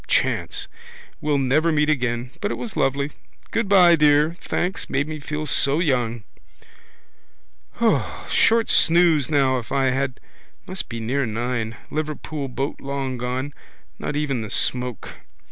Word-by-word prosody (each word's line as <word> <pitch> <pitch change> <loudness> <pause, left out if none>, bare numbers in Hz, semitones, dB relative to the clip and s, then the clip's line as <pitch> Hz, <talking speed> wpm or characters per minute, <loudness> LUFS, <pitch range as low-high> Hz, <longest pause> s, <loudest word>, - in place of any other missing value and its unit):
Chance. - - 0 0.5
We'll 150 -1 +1
never 140 +5 +2
meet 150 -1 +2
again. 125 -4 -1
But 205 - 0
it - - -2
was 235 - -6
lovely. 140 +2 0 0.4
Goodbye, 195 -6 +5
dear. 150 +1 +4
Thanks. 180 +2 -2
Made 140 +2 0
me 155 -1 -5
feel 150 +1 -4
so 140 0 +3
young. 120 - 0 2.0
Short 230 0 +3
snooze 165 -4 +4
now 135 -4 +2
if 115 - -11
I 135 -1 +2
had. 130 -1 -2 0.5
Must 190 0 -4
be 115 -1 -5
near 125 +4 -1
nine. 115 0 -2
Liverpool 155 -1 -4
boat 135 +2 -4
long 135 -2 -3
gone. 130 +3 -3 0.5
Not 150 - -3
even 145 -5 -1
the 110 - -6
smoke. 125 +1 -2
140 Hz, 135 wpm, -23 LUFS, 125-155 Hz, 2.0 s, Goodbye